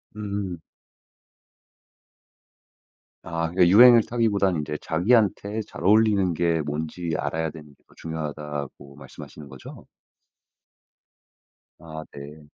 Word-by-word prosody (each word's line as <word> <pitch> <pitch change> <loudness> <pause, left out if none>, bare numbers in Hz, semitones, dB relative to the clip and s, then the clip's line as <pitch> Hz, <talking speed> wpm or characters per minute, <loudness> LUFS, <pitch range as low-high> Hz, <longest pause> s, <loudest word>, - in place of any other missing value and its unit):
음. 100 -4 -5 2.6
아. 85 0 -3
그 90 0 +3
유행을 115 +4 +7
타기보단 100 -8 0
이제 75 0 -5
"자기한테 105 +3 +1
잘 - - -10
어울리는 100 -2 +3
게 85 -1 0
뭔지 80 +3 -4
알아야 80 +2 -2
되는 75 -1 -12
게 - - -33
더 - - -23
중요하다."고 75 -3 -7
말씀하시는거죠? 70 -3 -12 2.0
아 80 -2 -9
네. 75 +2 -11
85 Hz, 215 characters per minute, -24 LUFS, 75-100 Hz, 2.6 s, 유행을